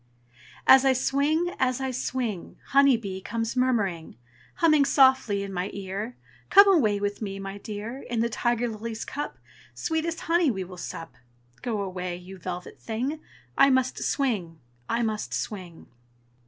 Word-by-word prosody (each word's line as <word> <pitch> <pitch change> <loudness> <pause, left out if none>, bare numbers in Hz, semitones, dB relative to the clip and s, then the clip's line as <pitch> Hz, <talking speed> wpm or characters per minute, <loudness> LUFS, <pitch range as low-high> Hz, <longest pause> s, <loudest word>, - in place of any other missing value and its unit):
As 265 0 +8
I 270 -1 +5
swing, 295 +7 +1
as 255 0 +1
I 265 -1 -2
swing, 240 -6 -3
Honey 275 -2 +5
bee 195 -4 -6
comes 225 +4 -3
murmuring, 210 -10 0 0.4
Humming 310 -4 +4
softly 260 -7 +4
in 195 -1 -6
my 180 +2 -2
ear, 200 +4 -5 0.3
"Come 400 +1 +8
away 235 - +4
with 205 +1 -2
me, 195 -2 -4
my 195 +1 -6
dear! 220 +5 -6
In 240 -2 -1
the 230 - +2
tiger 240 +1 0
lily's 220 0 -5
cup 290 +1 -5 0.4
Sweetest 325 +1 -2
honey 335 -2 +2
we 190 -6 -2
will 185 0 -10
sup." 165 -1 -7 0.5
Go 220 -4 -2
away, 180 -2 -4
you 185 +2 -11
velvet 180 0 -6
thing! 255 +7 -3 0.4
I 275 - +6
must 260 -1 +1
swing! 205 - -1 0.3
I 235 +1 +1
must 210 - -2
swing! 175 - -6
230 Hz, 155 wpm, -26 LUFS, 195-265 Hz, 0.5 s, As